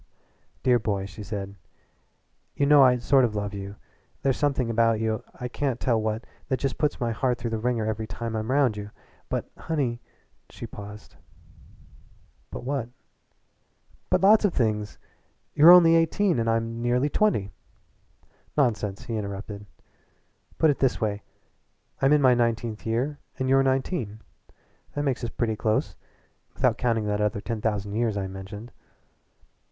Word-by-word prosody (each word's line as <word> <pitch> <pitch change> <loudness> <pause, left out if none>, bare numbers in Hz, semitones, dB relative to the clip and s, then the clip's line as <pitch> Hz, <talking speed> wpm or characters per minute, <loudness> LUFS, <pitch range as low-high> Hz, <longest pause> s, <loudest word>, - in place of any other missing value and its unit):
"Dear 125 -2 +4
boy," 100 -3 -2
she 100 +2 -10
said, 100 -1 -5 1.0
"you 140 - +1
know 145 0 +7
I 125 -2 +6
sort 130 +2 +3
of 115 -3 0
love 105 0 -3
you. 100 0 -6 0.5
There's 135 -2 +2
something 140 -4 0
about 115 -1 +2
you 110 -1 -1 0.2
I 125 - -3
can't 125 0 -2
tell 115 -3 +1
what 110 +2 -2 0.2
that 130 - 0
just 135 -1 -2
puts 150 - 0
my 120 -1 0
heart 125 +2 0
through 115 -1 -4
the 115 - -1
wringer 120 -1 0
every 110 0 -3
time 115 +2 -5
I'm 110 +1 -3
round 135 -4 +3
you. 105 0 -6 0.4
But - - -3
honey 135 -7 -2 0.2
" - - -42
She - - -8
paused. 105 +1 -11 1.3
"But - - -7
what?" 130 -2 -2 1.2
"But - - +2
lots 210 +3 +6
of 205 - +1
things. 105 -3 -1 0.5
But - - -15
you're 155 +3 +9
only 175 -2 +8
just 165 0 +6
eighteen, 170 -1 +1
and 115 0 0
I'm 115 +1 -1
nearly 125 +3 +2
twenty." 150 - +1 1.1
"Nonsense!" 105 -7 0
he 115 -2 -4
interrupted. 100 0 -6 0.9
"Put 160 - +4
it 140 - -4
this 135 -2 +1
way 105 -2 -1 0.8
that 135 - +3
I'm 145 - +5
in 150 -1 +4
my 130 -1 +6
nineteenth 115 -2 -1
year 130 +6 -1 0.2
and 130 - -1
you're 135 +1 +5
nineteen. 130 - -1 0.8
That 145 - -1
makes 130 -3 -1
us 120 - -2
pretty 110 -2 -1
close 110 0 0 0.6
without - - +1
counting 115 -3 +1
that 105 0 -1
other 105 -1 0
ten 115 +1 -4
thousand 105 -2 -2
years 110 -1 0
I 100 - -2
mentioned." 95 +4 -8
115 Hz, 165 wpm, -26 LUFS, 105-135 Hz, 1.3 s, you're